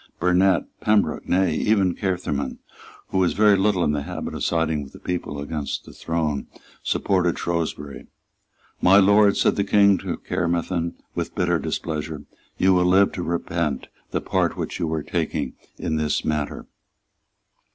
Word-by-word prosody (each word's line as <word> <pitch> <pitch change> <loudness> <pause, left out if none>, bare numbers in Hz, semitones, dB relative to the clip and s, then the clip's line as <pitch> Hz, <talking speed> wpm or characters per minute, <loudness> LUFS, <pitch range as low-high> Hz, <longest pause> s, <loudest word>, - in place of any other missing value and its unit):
Burnet, 90 +1 +3 0.2
Pembroke, 105 -1 +1
nay, 90 -2 +3
even 95 +1 +2
Caermarthen, 90 -8 -2 0.5
who 95 - 0
was 90 -2 +2
very 105 0 +5
little 95 -2 +2
in 75 - +2
the 75 -1 -1
habit - - -5
of - - -4
siding 80 -2 +1
with 70 -1 -10
the - - -12
people 85 -5 -4
against 75 0 -4
the - - -12
throne, 80 -4 -2 0.3
supported 90 -3 +1
Shrewsbury. 80 -4 -3 0.7
"My 95 +2 +6
Lord," 100 +1 +5
said - - +2
the 100 - +2
King 100 -1 +4
to - - -4
Caermarthen, 85 0 -1 0.2
with - - -4
bitter 85 -2 +1
displeasure, 80 +1 -4 0.3
"you 95 0 +4
will 90 -1 +3
live 95 +2 +4
to 90 - -5
repent 85 -4 -2 0.2
the - - -2
part - - 0
which - - -4
you 80 -2 -1
are 80 -2 -1
taking - - -2 0.2
in 80 - -2
this 75 -1 0
matter." 75 -2 -2
85 Hz, 155 wpm, -23 LUFS, 80-95 Hz, 0.7 s, My